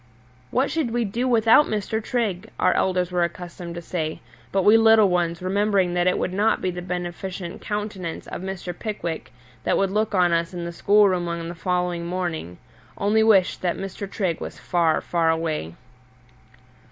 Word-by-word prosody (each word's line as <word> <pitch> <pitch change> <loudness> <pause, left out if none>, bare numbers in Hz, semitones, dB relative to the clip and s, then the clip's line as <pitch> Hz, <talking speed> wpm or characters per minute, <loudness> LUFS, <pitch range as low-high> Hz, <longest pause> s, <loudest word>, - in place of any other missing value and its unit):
"What 260 +3 +1
should 315 -7 0
we 235 0 0
do 235 +6 -1
without 230 +4 +5
Mr. 215 +1 -2
Trigg?" 215 -8 -2
our - - +4
elders 180 -1 +1
were 180 -1 +1
accustomed 170 0 -6
to 170 - -6
say; 160 -3 -3 0.3
but 195 -1 +1
we 210 +3 +7
little 225 -2 +6
ones, 175 -1 0
remembering 195 -1 +1
that 175 0 +1
it 180 - +2
would 185 - -2
not 210 +3 +2
be 185 - -1
the 180 0 -6
beneficent 180 0 -5
countenance 205 -5 -4
of - - -6
Mr. 190 -2 -5
Pickwick 175 -4 -5 0.3
that - - +1
would 195 -1 +1
look 215 +1 0
on 180 -2 +4
us 170 +1 0
in 175 -1 -4
the 170 - -4
schoolroom 195 -2 +3
on 170 0 -4
the - - -5
following 180 0 -1
morning, 170 - -3 0.4
only 210 +2 +2
wished 210 -4 +4
that 175 -2 0
Mr. 195 +1 -6
Trigg 185 -5 -2
was - - -6
far, 170 -3 +1
far 170 -2 +1
away. 160 - -1
180 Hz, 175 wpm, -23 LUFS, 170-210 Hz, 0.4 s, we